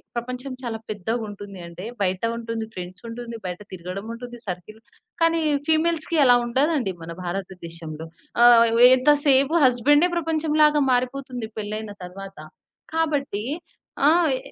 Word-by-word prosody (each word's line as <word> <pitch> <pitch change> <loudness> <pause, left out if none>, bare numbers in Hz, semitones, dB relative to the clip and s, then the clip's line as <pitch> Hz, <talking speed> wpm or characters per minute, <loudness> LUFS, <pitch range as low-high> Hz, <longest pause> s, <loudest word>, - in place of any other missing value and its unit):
ప్రపంచం 250 +3 -5
చాలా 235 -3 -4
పెద్దగుంటుంది 205 -1 -4
అంటే 170 +3 -9 0.2
బయట 185 -1 0
ఉంటుంది, 230 -1 -4
ఫ్రెండ్స్ 180 +4 -8
ఉంటుంది, 235 0 -7
బయట 180 -1 -4
తిరగడం 185 +2 -6
ఉంటుంది, 240 +1 -8
సర్కిల్ 185 +3 -7 0.4
కానీ, 330 0 +3 0.3
ఫీమేల్స్‌కి 320 +1 +1
అలా 245 -1 +7
ఉండదండి, 260 - +1
మన 165 - -7
భారతదేశంలో. 170 -4 -6 0.4
ఆహ్, 235 -1 +8 0.3
ఎంత 260 +3 +4 0.2
సేపు 275 +3 +4
హస్బెండే 290 +7 +4
ప్రపంచం 320 -2 -1
లాగా 300 -1 +4
మారిపోతుంది 250 -2 -2
పెళ్లయిన 215 0 -5
తరువాత. 195 +2 -10 0.6
కాబట్టి 285 -10 -1 0.6
ఆ! - - +7 0.3
ఎ - - -2
235 Hz, 125 wpm, -23 LUFS, 195-275 Hz, 0.6 s, ఆహ్